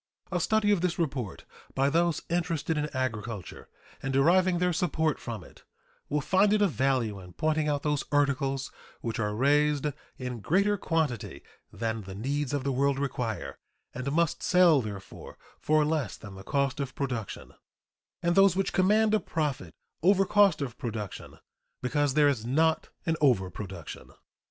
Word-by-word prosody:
A 180 - 0
study 210 +3 +2
of 200 -4 +2
this 180 -1 0
report 135 - -3 0.3
by 135 +1 +2
those 165 +2 +1
interested 165 -2 -1
in 150 0 -1
agriculture 115 -6 -4 0.3
and 135 - -2
deriving 175 +7 +4
their 180 0 +1
support 160 -3 0
from 115 -6 -6
it - - -17 0.5
will 150 0 0
find 195 +7 +3
it 215 - +2
of 195 - +2
value 125 -5 0
in 90 -1 -12
pointing 155 -1 0
out 145 -1 0
those 150 -2 0
articles 135 -2 +1 0.3
which 115 -1 -3
are 105 -1 -1
raised 145 +3 +2 0.3
in 125 -2 -5
greater 200 - +2
quantity 125 - -2 0.3
than 115 -1 -3
the 95 -1 -9
needs 140 +6 -2
of 145 -2 -1
the 140 - 0
world 140 +1 +1
require, 115 - -3 0.3
and 130 +2 -3
must 170 +1 +1
sell, 175 -6 +5
therefore, 100 -3 -8 0.2
for 155 0 +2
less 150 - -1
than 100 -2 -10
the 95 - -10
cost 140 +3 0
of 135 -2 -4
production, 125 -8 -4 0.7
and 170 0 +2
those 195 -1 +5
which 195 0 0
command 210 +3 +3
a 215 - +4
profit 155 -6 -3 0.3
over 195 +3 +4
cost 200 -7 +4
of 125 -2 -7
production 110 -7 -6 0.4
because 145 +2 0
there 150 -1 +5
is 130 -6 0
not 160 +7 +1 0.2
an 165 - +1
overproduction. 95 - -1
145 Hz, 160 wpm, -28 LUFS, 120-165 Hz, 0.7 s, sell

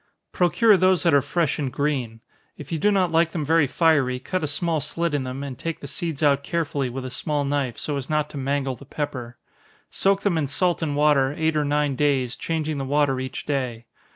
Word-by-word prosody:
_ - - -56
Procure 195 +5 +4
those 185 0 +3
that 170 -3 +3
are 140 - +6
fresh 160 +1 -1
and 135 -3 -2
green. 130 -6 -2 0.4
If 150 +1 -10
you 165 - -1
do 210 - +3
not 190 -4 +2
like 165 0 +2
them 155 -4 -2
very 160 -1 +3
fiery, 145 -4 +2
cut 185 +8 -3
a - - 0
small 160 +2 -1
slit 165 +2 -2
in 140 -3 0
them, 130 +2 -5
and 135 -2 -5
take 165 -1 -4
the - - -9
seeds 160 +1 -4
out 140 -1 +4
carefully 145 -4 -1
with 130 +1 -6
a 130 - -5
small 145 +2 -1
knife, 140 -4 -1
so 145 -2 -2
as 135 -1 -6
not 150 -1 +1
to - - -7
mangle 135 -1 -1
the 140 - -14
pepper. 130 -4 -5 0.5
Soak 195 0 +1
them 175 -5 +1
in 145 - -1
salt 175 +6 0
and 150 -3 -1
water, 145 -2 +3
eight 160 0 +1
or 150 -1 +1
nine 145 -1 +1
days, 135 -3 +1
changing 155 -3 -2
the - - -2
water 140 -1 +1
each 130 0 -5
day. 125 -5 -2
145 Hz, 230 wpm, -24 LUFS, 135-160 Hz, 0.5 s, are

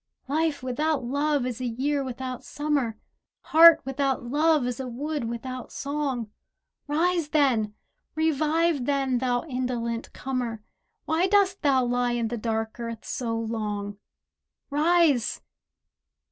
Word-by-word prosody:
Life 300 -1 0
without 285 +2 0
love 285 +2 0
is 250 -1 -4
a 250 - -1
year 275 +4 -1
without 255 -1 -5
Summer, 285 -7 -1 0.4
Heart 325 0 +8
without 270 0 -1
love 295 +2 +2
is 250 +1 -3
a 260 - -4
wood 285 +2 -3
without 240 +2 -5
song. 275 -6 -3 0.6
Rise 330 +1 +1
then, 245 -9 +2 0.4
revive 315 -1 +1
then, 270 -3 +1
thou 245 -1 0
indolent 250 -4 -3
comer: 245 -5 -4 0.4
Why 330 +4 +2
dost 390 -1 +3
thou 265 -4 +3
lie 245 0 +1
in 235 -2 -1
the 240 - -3
dark 220 0 -2
earth 230 -1 -6
so 230 -4 -2
long? 210 -3 -3 0.7
Rise! 305 -5 +3
260 Hz, 125 wpm, -26 LUFS, 240-300 Hz, 0.7 s, Heart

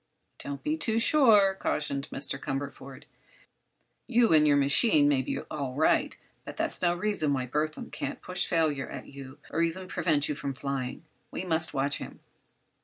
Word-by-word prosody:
"Don't 140 -1 -6
be 310 +1 -1
too 225 -7 -1
sure," 225 -6 +5
cautioned 140 -2 -2
Mr. 135 0 -1
Cumberford. 135 -1 -6 1.0
"You 240 -6 +3
and 150 -1 +5
your 145 -1 +4
machine 145 - +4
may 140 -2 +3
be 130 - -3
all 140 -4 -5
right, 155 +3 +2 0.3
but - - -9
that's - - -1
no 175 -1 +2
reason 175 -5 0
why 130 -2 -1
Burthon 150 +4 -3
can't - - -5
push 180 0 -2
failure 155 -5 0
at - - -7
you, 135 0 -11
or 165 - 0
even 170 +3 -2
prevent 150 -6 +1
you - - -1
from 140 -1 -5
flying. 135 +1 -4 0.2
We - - -5
must 160 -2 -1
watch 140 +1 0
him." - - -9
150 Hz, 170 wpm, -28 LUFS, 140-180 Hz, 1.0 s, sure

